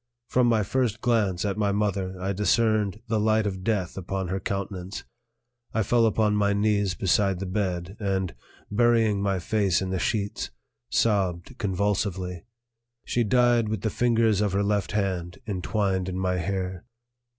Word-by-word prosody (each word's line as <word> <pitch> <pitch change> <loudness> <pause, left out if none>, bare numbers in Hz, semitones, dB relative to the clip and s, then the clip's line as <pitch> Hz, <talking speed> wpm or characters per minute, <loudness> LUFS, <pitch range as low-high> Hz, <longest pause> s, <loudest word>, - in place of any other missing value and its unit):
From 125 -1 +3
my 115 -3 +3
first 115 0 0
glance 110 -7 +1
at 100 +1 -1
my 100 -1 +2
mother 100 -2 -1
I 95 +2 -1
discerned 105 0 +1
the 110 -1 +1
light 110 0 +2
of 95 -2 -3
death 100 -5 -1
upon 95 0 -3
her 95 +1 -1
countenance. 95 -1 -4 0.7
I 110 - +2
fell 115 +2 +3
upon 105 -1 +2
my 100 -1 +2
knees 100 -2 +1
beside 95 0 +2
the 95 - -3
bed 95 -1 -2
and, 95 -4 -1 0.4
burying 115 -2 +3
my 100 -1 +1
face 100 -1 +1
in 95 -1 -3
the 95 - -1
sheets, 100 -1 -1 0.4
sobbed 95 - +1
convulsively. 95 -3 -1 0.6
She 120 - +1
died 120 0 +3
with 110 -3 -2
the 110 - -1
fingers 115 -4 +2
of 105 -3 0
her 100 +1 +2
left 100 -3 0
hand 90 -4 -1
entwined 95 -2 -1
in 90 - -4
my 90 -1 0
hair. 95 0 -3
100 Hz, 160 wpm, -26 LUFS, 95-110 Hz, 0.7 s, From